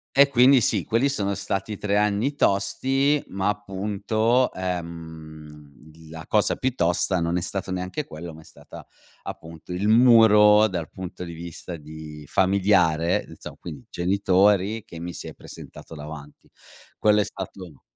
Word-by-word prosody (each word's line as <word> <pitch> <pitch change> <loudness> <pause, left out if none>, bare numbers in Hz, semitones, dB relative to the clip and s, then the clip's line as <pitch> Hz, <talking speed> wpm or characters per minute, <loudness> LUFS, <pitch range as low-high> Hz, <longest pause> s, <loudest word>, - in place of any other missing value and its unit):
e 140 +1 +7
quindi 130 0 +5
sì, 105 -4 +1
quelli 115 +5 +1
sono 100 -8 -1
stati 100 +1 -4
3 100 0 -1
anni 105 +6 +1
tosti, 135 +7 +1
ma 95 +1 -2
appunto, 105 +4 0
ehm, 80 -4 -7 0.2
l 80 0 -16
la 80 0 -9
cosa - - +2
più 130 -1 -2
tosta, 90 0 +1
non 85 +1 0
è - - -1
stato 95 +2 -4
neanche 95 +11 -4
quello, 80 - -9
ma 80 - -13
è - - -19
stata - - -14 0.4
appunto 80 +2 -9
il 95 +4 -1
muro, 110 -3 +6
dal 85 -5 -5
punto 90 -1 -8
di 85 - -8
vista 85 +1 -8
di 75 -1 -11
familiare, 90 -4 +2
insomma, - - -11
quindi 75 -7 -10
genitori 100 +3 +1
che 85 - -11
mi 85 0 -6
si - - -7
è - - -8
presentato 80 - -12
davanti. 75 -1 -10 0.5
Quello 105 0 +3
è - - +2
stato 90 -6 -9
95 Hz, 155 wpm, -24 LUFS, 80-105 Hz, 0.5 s, e